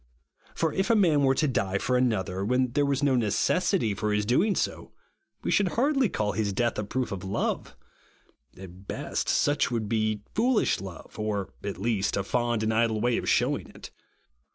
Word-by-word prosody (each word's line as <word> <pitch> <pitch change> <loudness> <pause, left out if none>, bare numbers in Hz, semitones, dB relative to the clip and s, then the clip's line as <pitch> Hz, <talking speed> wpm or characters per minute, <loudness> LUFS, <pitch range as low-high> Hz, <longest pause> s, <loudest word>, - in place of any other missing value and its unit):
For 160 -2 0
if 195 +3 0
a 230 - +5
man 170 -8 +4
wcTG 135 -1 +3
to 155 - +2
die 100 -7 0
for 125 +5 0
another, 100 -7 0
when 125 +3 +1
there 145 +2 +1
was 140 0 0
no 140 - +3
RIGHTEOUS 125 -2 +3
GRACE. 105 -2 +1
47 - - +2
necessity 180 - +1
for 105 +1 -2
his 105 0 +1
doing 185 - +2
so, - - -3 0.5
we - - -1
should 200 - +3
hardly 270 - +2
all 105 -1 0
his 105 -2 -1
death 120 +1 0
a - - -1
proof 125 +5 -3
of 95 -2 -5
love. 95 +1 -2 0.8
At 95 +1 -12
best, - - -3
such 145 +1 +2
would 115 -3 -2
be 110 -1 -1
foolish 240 +1 +2
love, 95 +2 -10
or, 105 -2 -2
at 100 -1 -4
least, 105 -1 0
a 100 - 0
fond 120 +1 0
and 110 0 +1
idle 110 -1 +1
way 120 +1 +1
of - - -2
shewing - - +1
it. - - -12
115 Hz, 200 wpm, -27 LUFS, 105-140 Hz, 0.8 s, a